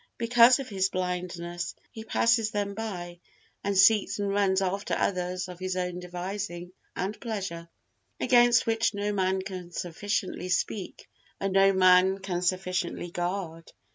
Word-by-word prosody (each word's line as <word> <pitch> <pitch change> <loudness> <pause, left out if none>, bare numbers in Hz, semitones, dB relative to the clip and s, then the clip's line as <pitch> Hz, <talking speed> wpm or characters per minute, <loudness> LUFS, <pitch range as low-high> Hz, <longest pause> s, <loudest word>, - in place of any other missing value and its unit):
because 235 +1 +6
of 275 -2 -6
his 190 -3 0
blindness, 175 -2 -4 0.2
he 220 - -8
passes 230 0 +2
them 205 -2 -2
by 180 -5 -6 0.4
and 200 -1 0
seeks 205 +2 +5
and 200 -1 -1
runs 195 -1 +2
after 195 +2 -1
others 180 -1 -1
of 180 -1 -10
his 185 0 -3
own 180 -1 -2
devising 180 0 -5 0.2
and 195 +3 -4
pleasure, 190 -7 -5 0.5
against 240 -1 +5
which 225 -1 +1
no 205 +1 -1
man 190 -1 0
can 185 -2 -7
sufficiently 185 +2 -3
speak 180 +2 -2 0.3
and 195 -1 -2
no 195 0 +5
man 185 0 +5
can 190 -2 -3
sufficiently 180 -1 -2
guard. 175 -2 -4
190 Hz, 140 wpm, -27 LUFS, 180-205 Hz, 0.5 s, because